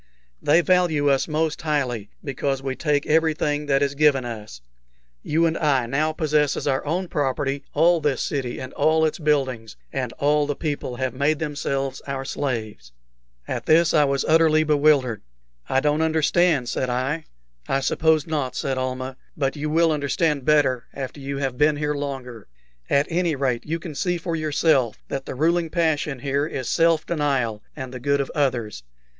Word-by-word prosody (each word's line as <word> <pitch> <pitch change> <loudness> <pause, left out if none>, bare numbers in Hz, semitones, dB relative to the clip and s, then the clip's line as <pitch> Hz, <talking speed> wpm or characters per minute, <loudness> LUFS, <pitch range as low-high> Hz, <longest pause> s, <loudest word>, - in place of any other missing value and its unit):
They 160 +4 +4
value 170 -4 +2
us 135 - +1
most 155 0 -1
highly, 130 -9 -1
because 135 -1 -2
we 135 -1 -2
take 145 -2 0
everything 150 -2 +1
that 135 0 +3
is 140 0 0
given 140 -3 +3
us. 105 - -7 0.6
You 165 +2 +1
and 165 0 +1
I 140 -6 +2
now 150 +6 0
possess 150 -2 +1
as - - -4
our 135 -2 0
own 180 +4 -1
property 140 -1 -1
all 165 +2 +4
this 145 -2 0
city 130 -4 -3
and 130 0 -7
all 160 0 +3
its 155 - -2
buildings, 135 -8 0 0.2
and 130 -4 -2
all 145 +1 +1
the 145 - -1
people 145 -5 -3
have 130 0 -2
made 140 +4 +1
themselves 140 -3 -3
our 135 -1 -3
slaves." 110 - -4 0.6
At - - -4
this 165 +1 +4
I 150 - +5
was 140 -1 0
utterly 155 -1 +4
bewildered. 145 -6 +2 0.5
"I 130 - +3
don't 150 +2 +1
understand," 160 -3 +2
said 125 +2 -1
I. 135 +6 -1 0.4
"I 135 - +1
suppose 155 +3 +2
not," 145 -5 -2
said 135 -1 -2
Almah; 130 0 -4 0.2
"but 135 -1 0
you 150 +1 -3
will 165 +1 +3
understand 145 -1 0
better 140 -5 +3
after 135 +1 -6
you 140 0 -4
have 135 -3 -3
been 150 0 +4
here 150 0 -1
longer. 135 -6 -6 0.4
At 140 +1 +3
any 170 -2 +1
rate, 130 -3 -1
you 165 +2 -1
can 165 -1 -8
see 175 +4 -1
for 170 0 -3
yourself 150 -6 +1
that 135 -1 -4
the - - -5
ruling 165 +4 +1
passion 155 -4 0
here 140 +2 0
is 130 -6 -5
self 165 -1 +2
denial 135 -9 -1
and 130 -3 -7
the 130 - -6
good 140 +3 +1
of 140 - -2
others. 120 - -1
145 Hz, 175 wpm, -23 LUFS, 130-155 Hz, 0.6 s, I